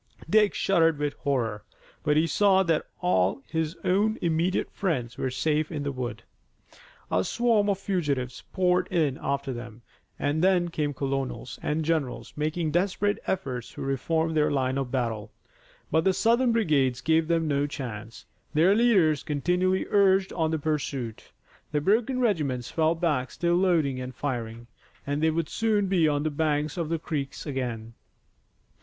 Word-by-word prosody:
Dick 210 -1 +4
shuddered 165 -5 +3
with 145 0 -1
horror, 115 -7 -2 0.4
but 150 0 +2
he 160 - +4
saw 190 +4 +4
that 165 -3 0
all 115 - +1
his 160 0 -2
own 210 +4 +2
immediate 170 +2 0
friends 130 - -2
were 130 - -2
safe 150 +5 0
in 150 -3 -3
the 140 - -2
wood. 120 -5 -5 0.9
A 90 - +2
swarm 225 - +2
of 200 - +1
fugitives 145 -11 -2
poured 180 -1 +2
in 155 -7 0
after 140 -1 -2
them, 120 -1 -9 0.3
and 150 +3 0
then 180 -2 +3
came 150 -3 -2
colonels 135 -2 -3
and 155 +1 -1
generals 130 -8 -2
making 155 +1 -1
desperate 195 +4 +1
efforts 130 -10 -3
to - - -6
reform 160 +4 0
their 150 -1 +3
line 135 -1 0
of 135 -2 -3
battle. 115 -5 -2 0.6
But 160 +1 +3
the 190 - +4
Southern 235 +5 +3
brigades 145 - +2
gave 160 +4 +2
them 165 -1 +1
no 145 -1 +1
chance. 115 -6 -7 0.3
Their 170 +6 +5
leaders 200 -10 +4
continually 180 +6 0
urged 195 -1 +4
on 160 -2 0
the 160 - 0
pursuit. 140 -6 -3 0.4
The 150 - +1
broken 225 - +1
regiments 150 - 0
fell 160 0 +2
back 150 -7 0
still 170 0 0
loading 165 -8 +2
and 125 0 -7
firing, 120 -4 -4 0.4
and 145 +1 -2
they 160 - +4
would 160 0 -1
soon 215 0 +1
be 180 -4 +3
on 145 -1 +1
the 155 - -1
banks 150 -1 0
of 170 -3 -3
the 165 - 0
creek 145 -4 -4
again. 120 -5 -4
155 Hz, 160 wpm, -27 LUFS, 135-180 Hz, 0.9 s, Their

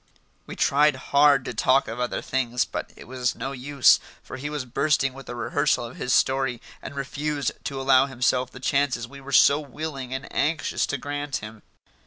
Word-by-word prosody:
We - - -7
tried 145 +1 +3
hard 140 0 +3
to - - -4
talk 130 +5 +3
of 115 +2 -6
other 125 0 -2
things, 125 -2 0
but - - -6
it - - -13
was 125 -1 -2
no 135 - -4
use, 140 0 +4 0.2
for - - -8
he 145 +3 -5
was 150 -3 -4
bursting 135 +1 +1
with 135 0 -12
the 120 - -6
rehearsal 120 0 0
of 115 - -10
his 125 - -3
story 130 -1 +2 0.2
and - - -8
refused 145 0 -2
to 135 -1 -3
allow 135 0 +4
himself 125 -1 0
the 125 - -12
chances 130 -3 0
we 140 +2 -12
were 135 +1 -9
so 140 +2 +6
willing 140 -2 -6
and 130 +1 -4
anxious 155 +1 0
to 145 - -2
grant 145 +1 -4
him. 105 0 -6
135 Hz, 195 wpm, -25 LUFS, 125-145 Hz, 0.2 s, so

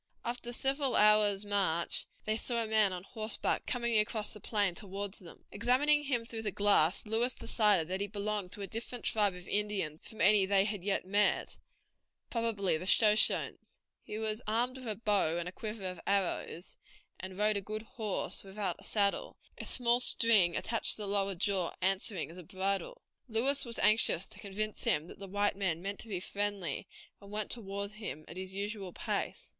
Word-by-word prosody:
After 240 0 -3
several 270 +2 0
hours' 210 -1 +5
march 190 -5 +2 0.2
they 215 - 0
saw 235 +1 -1
a - - -4
man 215 -2 +3
on 180 -1 -5
horseback 215 +1 -1
coming 235 -3 +1
across 210 0 0
the 210 - -8
plain 205 -3 0
toward 200 +1 -5
them; 180 -5 -14
examining 295 +4 +3
him 245 -4 -1
through 230 -1 -5
the 215 - -1
glass 200 -2 +4
Lewis 225 +4 +1
decided 205 -8 +3
that 190 +2 -3
he 200 - -1
belonged 205 -2 -3
to 205 - -5
a - - -4
different 235 +4 -5
tribe 205 -4 +2
of 180 0 -11
Indians 200 -7 0
from 220 - -13
any 195 +1 +5
that 200 - +1
they 195 0 +5
had 205 -3 -3
yet 195 -2 0
met, 205 +2 +1 0.7
probably 220 -7 0
the 180 - -6
Shoshones. 215 +1 +3 0.2
He 210 - -7
was 220 +1 -2
armed 240 +4 0
with 255 - -8
a 215 - -2
bow 200 -7 +2
and 175 0 -3
a - - -5
quiver 210 0 -6
of 180 -2 -5
arrows, 195 -2 -2 0.4
and 185 0 -7
rode 210 0 +2
a - - -2
good 215 +2 -6
horse 215 -3 -2
without 195 -2 -3
a - - -14
saddle, 200 -2 0 0.2
a - - -6
small 240 -1 +2
string 220 -8 +4
attached 230 -1 +1
to - - -10
the - - -4
lower 195 -1 0
jaw 190 -1 +1
answering 190 -2 +1
as 175 - -11
a - - -9
bridle. 195 - -3 0.2
Lewis 265 +5 +2
was 235 -1 0
anxious 210 -4 +3
to - - -13
convince 210 +2 -3
him 150 +1 +2
that 175 - -13
the 200 - -7
white 205 +2 0
men 185 -5 -1
meant 200 +3 -5
to - - -7
be 195 -5 -3
friendly, 200 -1 -3 0.3
and 200 - -13
went 210 0 -2
toward 200 -3 -3
him 210 -8 -7
at - - -10
his 185 0 -5
usual 200 -1 -4
pace. - - -3
205 Hz, 195 wpm, -32 LUFS, 190-220 Hz, 0.7 s, hours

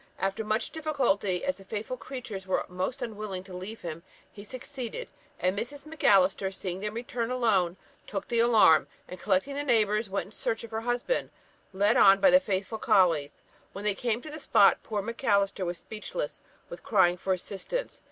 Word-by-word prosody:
After 195 +3 -1
much 215 +2 -1
difficulty, 255 - 0
as 280 - -1
the - - -12
faithful 215 +5 -4
creatures 235 -8 -7
were 190 - 0
most 185 +6 -3
unwilling 210 -4 -5
to 190 -1 -12
leave 190 +5 -7
him, 165 -1 -6 0.3
he 205 - -11
succeeded; 255 - -6 0.3
and 185 +1 +1
Mrs. 280 +8 -5
Macalister, 195 -11 +3
seeing 185 -1 -5
them 210 +2 -4
return 235 0 -3
alone, 205 -8 +1 0.3
took 195 -2 -4
the 235 - 0
alarm, 220 -10 +6 0.2
and 180 - -9
collecting 195 +7 +1
the 285 - -2
neighbours, 215 -5 +2
went 195 +1 -2
in 195 - -15
search 225 +1 -3
of 230 - -9
her 220 0 -2
husband, 245 - -1 0.4
led 205 +3 +3
on 195 0 +7
by 280 - +6
the 275 - +8
faithful 205 -3 -3
colleys. 165 -9 +2 0.3
When 200 +1 -7
they 210 - +2
came 235 +3 -2
to 310 - -8
the 310 - -7
spot, 200 -8 +4
poor 210 -3 -3
Macalister 200 -4 0
was 175 0 -3
speechless 220 - -6 0.3
with - - -9
crying 185 -5 +3
for 190 - -2
assistance. 200 - -3
210 Hz, 180 wpm, -28 LUFS, 190-240 Hz, 0.4 s, the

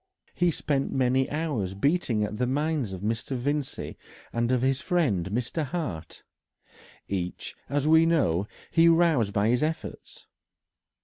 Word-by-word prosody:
He 175 0 +2
spent 140 -3 -1
many 130 0 +2
hours 140 - -2
beating 125 - +1
at 105 +1 -3
the 125 +1 0
minds 145 -3 0
of 95 -1 -6
Mr. 115 +5 -2
Vincey 140 +2 -3 0.3
and 120 +1 0
of 125 -1 +1
his 135 +1 +1
friend 120 - +1
Mr. 125 - -2
Hart. 140 - -5 0.8
Each, 90 -2 -4
as 145 +1 0
we 160 +1 +6
know, 100 - +2 0.2
he 165 0 +5
roused 165 -11 +3
by 105 +2 +1
his 125 +1 +2
efforts. 160 +1 -4
130 Hz, 140 wpm, -27 LUFS, 105-155 Hz, 0.8 s, we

